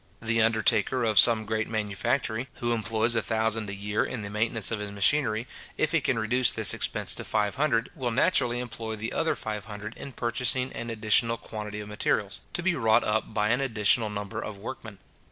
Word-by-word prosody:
The 115 0 +1
undertaker 115 +2 +2
of 110 -2 +5
some 115 -2 +6
great 110 0 -2
manufactory, 110 +3 -2
who 120 0 -2
employs 115 +1 0
a 115 - +1
thousand 110 -1 0
a - - -4
year 105 +1 -1
in 115 -4 -5
the 100 - -6
maintenance 110 0 +1
of 115 - -2
his 105 0 -5
machinery, 110 +2 +2 0.3
if - - +1
he - - +2
can - - 0
reduce 120 +3 +2
this 110 -3 +4
expense - - -1
to - - -4
five 105 -2 0
hundred, 130 -5 0
will 130 -6 -3
naturally 120 -1 +1
employ 115 -2 -5
the 110 +2 -5
other 160 0 0
five 105 -2 -5
hundred 105 +1 -8
in 140 - -9
purchasing 125 +2 0
an 115 - -5
additional 115 +1 +2
quantity 105 -1 -7
of 105 - -9
materials, 105 -1 -1
to 175 - -2
be 190 0 +2
wrought 115 -5 +3
up 110 +1 -1
by 105 -1 0
an 125 +3 +1
additional 110 -3 +2
number 105 -2 -5
of 105 -2 -7
workmen. 110 -1 -8
110 Hz, 200 wpm, -27 LUFS, 105-120 Hz, 0.3 s, some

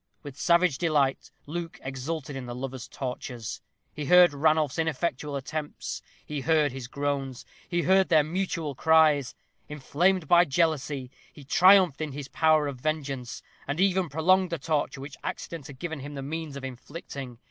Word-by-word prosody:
With 145 -3 -8
savage 170 -3 +3
delight 145 -5 +1 0.2
Luke 165 +2 -6
exulted 135 +2 -4
in 130 -2 -6
the 120 - -5
lovers' 130 -1 -6
tortures. 125 -2 -6 0.3
He 150 - -5
heard 180 0 +7
Ranulph's 155 0 +2
ineffectual 150 -2 -1
attempts; 150 +2 -5 0.2
he 150 -2 -4
heard 155 -1 +2
his 130 -2 -7
groans; 140 -2 -3 0.2
he 175 -1 0
heard 190 +1 +4
their 155 -3 +5
mutual 165 -2 -2
cries. 155 -2 +3 0.3
Inflamed 160 +5 +1
by 175 0 +7
jealousy, 145 -4 0 0.2
he 145 - -13
triumphed 180 +1 +5
in 155 -3 -3
his 145 0 -7
power 155 -2 +3
of 135 -3 -6
vengeance, 140 -5 -3 0.2
and 145 +3 -2
even 190 -2 +2
prolonged 180 +5 +3
the 170 - -2
torture 145 -2 -2
which 140 0 -9
accident 165 -5 -5
had 140 - -11
given 160 0 -5
him 145 +2 -8
the 135 - -5
means 155 0 -5
of 140 - -7
inflicting. 135 -1 -8
150 Hz, 160 wpm, -27 LUFS, 135-165 Hz, 0.3 s, heard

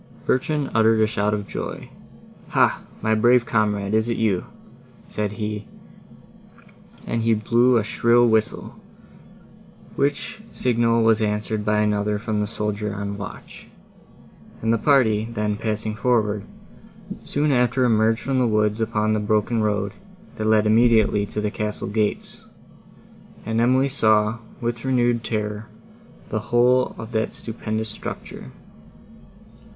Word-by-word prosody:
Bertrand 145 +2 0
uttered 110 0 +4
a 110 - +5
shout 105 -1 -1
of 105 -1 -3
joy. - - -6 0.6
"Hah! - - +2 0.2
my 110 0 +2
brave 120 +2 +4
comrade, 105 -3 0
is 110 +1 +1
it 115 - -1
you?" 105 -5 0 0.6
said 105 -1 -3
he, 105 -1 -5 1.4
and 115 - -2
he 115 0 +2
blew 120 +3 +3
a 110 - +1
shrill 120 +2 +3
whistle, 110 -1 -1 1.2
which 145 +9 -2
signal 115 -2 +1
was 110 -1 +3
answered 105 0 -1
by 105 0 +1
another 105 0 0
from 105 0 -2
the 105 - -1
soldier 105 -1 -3
on 100 0 -4
watch; 100 -1 -9 1.0
and 115 0 +2
the 115 - +1
party, 110 -5 +3
then 105 -2 -1
passing 110 0 -3
forward, 105 -2 0 0.8
soon 145 +1 0
after 125 0 +2
emerged 115 -1 +2
from 135 -1 -1
the 125 - +2
woods 105 0 +1
upon 110 -1 0
the 110 - +1
broken 110 +2 0
road, 105 -1 0 0.5
that 110 - -3
led 110 -1 +4
immediately 110 -2 +3
to 105 - -5
the 105 0 -1
castle 105 0 -4
gates, 105 +1 -2 1.0
and 110 +1 0
Emily 130 +3 +3
saw, 110 -4 +2 0.2
with 120 -1 -3
renewed 120 -3 +1
terror, 105 -1 -3 0.6
the - - -1
whole 125 +2 +2
of 110 +1 -8
that 110 -1 -1
stupendous 110 -1 -4
structure. - - -8
110 Hz, 135 wpm, -22 LUFS, 105-120 Hz, 1.4 s, a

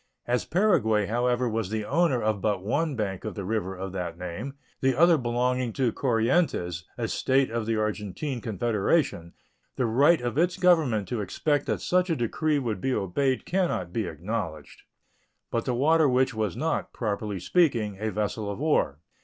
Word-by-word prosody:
As 125 +1 0
Paraguay, 155 - +2
however, 120 +3 +1
was 110 -4 -2
the 110 0 -2
owner 165 -5 +2
of 105 -2 0
but 100 -3 0
one 145 +8 0
bank 100 -5 -3
of - - -5
the 100 - -5
river 95 -2 -2
of 95 0 -5
that 90 -3 -4
name, 90 +10 -6 0.2
the 130 -1 +2
other 170 +4 +6
belonging 125 -2 0
to 130 -4 +1
Corientes, 115 - 0
a - - -1
State 130 -1 +1
of 115 -1 -2
the 115 - +1
Argentine 110 +5 -3
Confederation, 110 - 0 0.4
the 125 - 0
right 140 +9 +4
of 125 +4 -2
its 175 +1 +2
Government 150 - +3
to 120 -3 -2
expect 145 - -1
that - - -1
such 180 +1 +1
a 165 - +2
decree 150 +5 0
would 115 -8 -2
be 135 -1 0
obeyed 130 +7 0
can 185 +1 +1
not 90 - -4
be 110 -5 -1
acknowledged. 85 -2 -5 0.7
But 115 - -1
the 125 - 0
Water 155 +3 +4
Witch 130 +1 +2
was 110 -2 -2
not, 160 0 -2
properly 105 -3 -3
speaking, 115 - +1
a 110 +1 -1
vessel 105 +1 -2
of 100 - -4
war. 145 - +1
115 Hz, 180 wpm, -27 LUFS, 105-140 Hz, 0.7 s, other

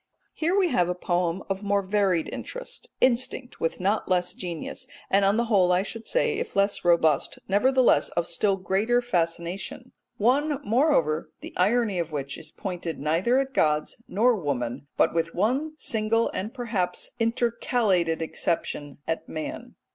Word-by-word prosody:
Here 340 +5 0
we 375 -3 +3
have 175 - +2
a 180 - -1
poem 175 0 -1
of 195 0 -2
more 200 -1 +1
varied 190 -4 +1
interest, - - -6
instinct 255 0 +1
with 165 - -1
not 200 +4 0
less 180 -1 +1
genius, 175 -4 -6 0.2
and 195 +1 +4
on 200 +2 +3
the 235 - +2
whole 195 -6 +3
I 180 +1 +3
should 225 +2 -7
say, 465 -4 +1
if 470 -1 -5
less 200 +1 +1
robust, 165 -4 +3
nevertheless 255 +6 +4
of 170 - +2
still 190 +4 +1
greater 195 +6 +1
fascination 180 +2 -2 0.3
one, 275 +6 +2
moreover, 205 - +2
the - - -9
irony 210 0 +2
of 165 -1 -2
which 140 -2 -4
is 160 - -10
pointed 175 -4 -5
neither 170 - +2
at 270 0 0
gods 150 +5 +1
nor 235 +5 +3
woman, 140 - -3
but - - +3
with 165 0 -1
one 260 - 0
single 225 -3 0
and 205 +4 -3
perhaps 220 -9 -3
intercalated 225 -7 +1
exception, 150 -3 -2
at 165 - -3
man. 155 -1 -6
195 Hz, 155 wpm, -26 LUFS, 170-240 Hz, 0.3 s, and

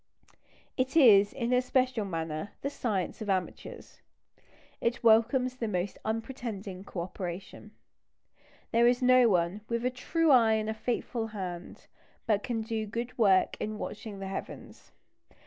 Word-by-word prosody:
It 260 +4 0
is, 205 -8 +7
in 245 -2 -2
a 250 - +4
special 255 -3 0
manner, 165 0 -4
the 280 - -2
science 210 - -2
of 210 - -4
amateurs. 185 -2 -4 0.8
It 235 +1 -1
welcomes 245 +3 +4
the 230 - -2
most 185 -1 -3
unpretending 220 -4 -5
co 195 -3 -5
operation. 180 +1 -7 1.0
There 235 +1 +4
is 245 +1 +2
no 255 -1 +6
one 180 +1 +1
"with 235 +1 -1
a 250 - +1
true 315 +5 +1
eye 230 -4 +6
and 220 0 0
a - - -2
faithful 230 0 -3
hand" 185 -5 -7 0.4
but 210 -2 +2
can 225 -1 -3
do 220 -1 -3
good 235 +4 -5
work 195 -4 +4
in 215 0 -4
watching 210 -1 -6
the 195 0 -6
heavens. 190 - -8
220 Hz, 145 wpm, -29 LUFS, 195-245 Hz, 1.0 s, is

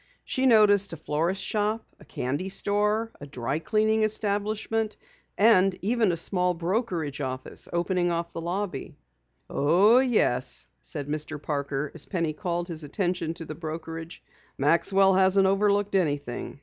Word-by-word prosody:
She 265 0 +1
noticed 205 -5 +5
a - - -6
florist 165 +6 -1
shop, 215 +1 -1
a - - -16
candy 145 +10 -3
store, 210 +3 0
a 145 - -8
dry 135 +1 -3
cleaning 220 +4 +1
establishment, 215 +1 -1 0.4
and 195 -3 +5
even 220 -1 +2
a 170 - -2
small 180 +1 0
brokerage 170 - -2
office 130 -1 -4
opening 175 +1 0
off 170 0 -2
the 165 - -5
lobby. 175 -3 -4 0.5
"Oh, 195 - +4
yes," 215 - +1
said 145 -2 -3
Mr. 150 0 -3
Parker 145 -1 -3
as 165 - 0
Penny 165 -5 -1
called 175 -1 -3
his 165 -3 -4
attention 175 0 -2
to 165 -1 -8
the 155 - -6
brokerage. 165 +1 -7 0.3
"Maxwell 190 +7 +3
hasn't 190 +1 +4
overlooked 200 +1 +2
anything. 145 -8 -2
180 Hz, 140 wpm, -26 LUFS, 155-205 Hz, 0.5 s, noticed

